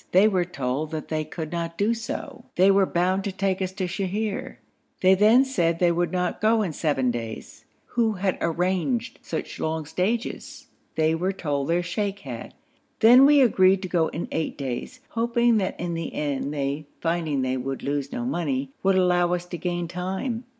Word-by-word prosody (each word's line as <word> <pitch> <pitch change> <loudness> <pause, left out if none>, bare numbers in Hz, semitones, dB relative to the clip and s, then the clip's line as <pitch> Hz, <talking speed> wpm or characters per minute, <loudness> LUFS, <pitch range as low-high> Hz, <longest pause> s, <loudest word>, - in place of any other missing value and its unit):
They 190 +4 +7
were 185 -4 +1
told 140 -2 -3
that 155 -1 -5
they 155 -1 -1
could 155 0 -6
not 170 -1 -3
do 210 +3 +2
so: 230 +1 -6
they 190 +2 +5
were 195 -1 +4
bound 185 +3 +1
to 200 - -2
take 190 0 -1
us 185 -1 -1
to 190 -1 -2
Sheher. 195 +3 -3 0.5
They 185 0 +6
then 215 +7 +5
said 170 -11 +1
they 175 0 +3
would 175 +1 0
not 180 -1 -1
go 220 0 +3
in 175 -6 -3
seven 135 -6 +1
days 115 -2 -7 0.2
who 230 -2 +1
had 190 -1 -1
arranged 190 - -1
such 160 - -5
long 160 0 -2
stages? 210 +9 -3 0.3
They 160 0 +2
were 180 +4 0
told 145 -7 -2
their 170 +2 +1
sheikh 200 +2 -3
had. 125 -4 -8 0.4
Then 250 +5 +8
we 290 -1 +6
agreed 190 -5 +4
to - - -2
go 165 -3 +2
in 165 - -4
eight 160 - -2
days, 135 - -5
hoping 235 0 +2
that 190 -3 -2
in 175 0 -2
the 165 -1 -4
end 145 -1 -2
they, 145 +1 -3
finding 165 -5 0
they 130 0 0
would 135 +1 -4
lose 140 0 -2
no 245 - -3
money, 140 - -2
would 195 0 +3
allow 175 -1 +3
us 175 0 -5
to 180 0 -6
gain 175 -1 -2
time. 190 +8 -3
180 Hz, 190 wpm, -25 LUFS, 155-200 Hz, 0.5 s, Then